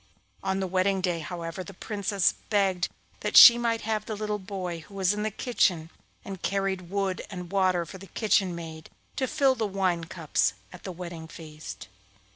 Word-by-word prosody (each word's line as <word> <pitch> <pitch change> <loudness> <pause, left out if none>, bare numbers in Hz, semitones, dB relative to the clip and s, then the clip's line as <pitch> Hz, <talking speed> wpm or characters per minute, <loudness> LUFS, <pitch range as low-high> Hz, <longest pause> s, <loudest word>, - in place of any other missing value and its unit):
On 190 0 -1
the 190 - -1
wedding 190 +1 +1
day, 180 -2 0
however, 170 +2 -5
the 195 0 -11
Princess 200 -2 0 0.2
begged 195 -4 +2 0.3
that - - +1
she 235 0 +11
might 230 -1 0
have 215 -1 -2
the 220 - -3
little 210 0 -2
boy 185 -3 -5
who 165 +5 -14
was 190 0 +2
in 210 - -3
the 215 - 0
kitchen, 180 -7 0 0.3
and 195 -2 -7
carried 195 -2 -1
wood 195 -1 -1
and 180 -3 -7
water 185 -3 +2
for 190 +4 -10
the 195 - -11
kitchen 195 -2 +1
maid, 160 -2 -8 0.3
to 260 - 0
fill 270 +1 +3
the 225 -4 -1
wine 185 -4 0
cups 165 - 0 0.2
at - - -12
the 190 - -4
wedding 170 -2 -7
feast. 155 -1 -9
190 Hz, 185 wpm, -27 LUFS, 175-200 Hz, 0.3 s, she